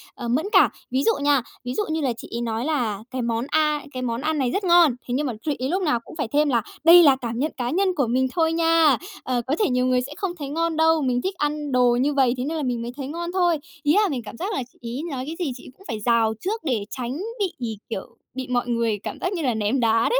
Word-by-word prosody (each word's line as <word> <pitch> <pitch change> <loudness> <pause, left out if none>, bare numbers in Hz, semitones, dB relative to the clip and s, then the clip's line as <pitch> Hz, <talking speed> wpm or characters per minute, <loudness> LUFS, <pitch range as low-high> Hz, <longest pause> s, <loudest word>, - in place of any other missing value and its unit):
à, 240 - -6
mẫn 255 +8 +1
cảm. - - +6 0.2
Ví 260 +2 +1
dụ - - +4
nha, 285 -2 +3 0.2
ví 250 0 -4
dụ 420 - 0
như 315 0 -1
là 260 -4 0
chị - - -9
ấy 235 - -2
nói 230 +1 -2
là 235 -9 -1
cái 255 -1 -2
món 235 0 -1
A, 300 -1 +2
cái 255 - -4
món 240 0 -2
ăn 315 0 0
này 260 -4 +1
rất 395 - -1
ngon, 340 -7 +5
thế 245 - -2
nhưng 285 +3 0
mà 250 - -2
chị 300 -2 0
ấy 260 +1 -1
lúc 375 +4 0
nào 270 -8 +2
cũng 235 - -13
phải 295 -6 -2
thêm 290 +5 +2
là 235 -4 +2 0.2
"Đây 340 +2 +9
là 280 -3 +6
cảm 235 -2 -4
nhận 305 +4 0
cá 245 -1 -2
nhân 380 +8 +2
của 275 -7 +1
mình 260 +3 +2
thôi 325 -1 +2
nha. 330 -4 +4 0.3
Ờ, 250 -2 0
có 280 - +1
thể 425 - +2
nhiều 250 0 +1
người 255 -1 +2
sẽ 265 +3 -7
không 390 -3 -2
thấy 280 -2 -5
ngon 330 +2 -1
đâu, 320 0 +4
mình 250 -3 +1
thích 380 +5 -2
ăn 295 -1 -2
đồ 250 -1 +4
như 290 +3 +1
vầy 265 -3 +3
thế 250 - -2
nên 320 +3 -2
là 305 - -2
mình 245 -3 -1
mới 235 +1 -4
thấy 270 -2 -4
ngon 340 +4 -4
thôi." 350 -3 +2 0.3
Ý 295 0 +3
là 420 +2 +4
mình 265 -6 -2
cảm 230 - -9
giác 390 +5 -3
là 270 - -1
chị - - -29 0.2
ấy 275 - -3
nói 260 -2 -3
cái 320 - -4
gì 330 -7 -1
chị 250 - -12
ấy - - -11
cũng 390 - -18
phải 220 - -3
rào 225 0 +2
trước 435 - -3
để 235 -9 -1
tránh 255 +2 -4 0.2
bị, 250 - -3
kiểu, 210 -4 -6 0.2
bị 260 0 -5
mọi 245 -1 0
người, 230 -3 0
cảm - - -5
giác 365 - -1
như 350 - -2
là, 255 -5 +1
ném 220 +4 0
đá 230 -1 +3
đấy. - - +3
270 Hz, 295 wpm, -23 LUFS, 245-320 Hz, 0.3 s, Đây